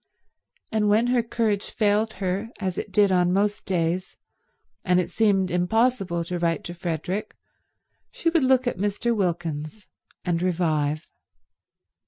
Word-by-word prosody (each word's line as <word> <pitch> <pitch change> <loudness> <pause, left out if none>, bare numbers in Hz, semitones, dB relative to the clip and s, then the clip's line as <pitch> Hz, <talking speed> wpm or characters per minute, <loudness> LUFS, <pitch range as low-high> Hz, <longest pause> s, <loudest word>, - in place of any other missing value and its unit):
And 215 -1 +2
when 215 +3 +4
her 245 - +4
courage 225 -3 -1
failed 215 +1 +1
her, 195 +3 -2
as 190 -3 -2
it 205 - -6
did 200 0 +4
on 180 -1 +3
most 205 +2 0
days, 180 0 -1 0.7
and 180 -1 +3
it 180 - -2
seemed 195 -4 +2
impossible 185 -1 +1
to 175 +1 -4
write 170 -1 0
to 175 - -6
Frederick, 175 +3 -4 0.8
she - - 0
would 330 -4 +3
look 260 0 +3
at 245 - -2
Mr. 205 +4 0
Wilkins 170 -1 -3 0.4
and 175 -2 0
revive. 160 -4 0
190 Hz, 140 wpm, -25 LUFS, 175-215 Hz, 0.8 s, when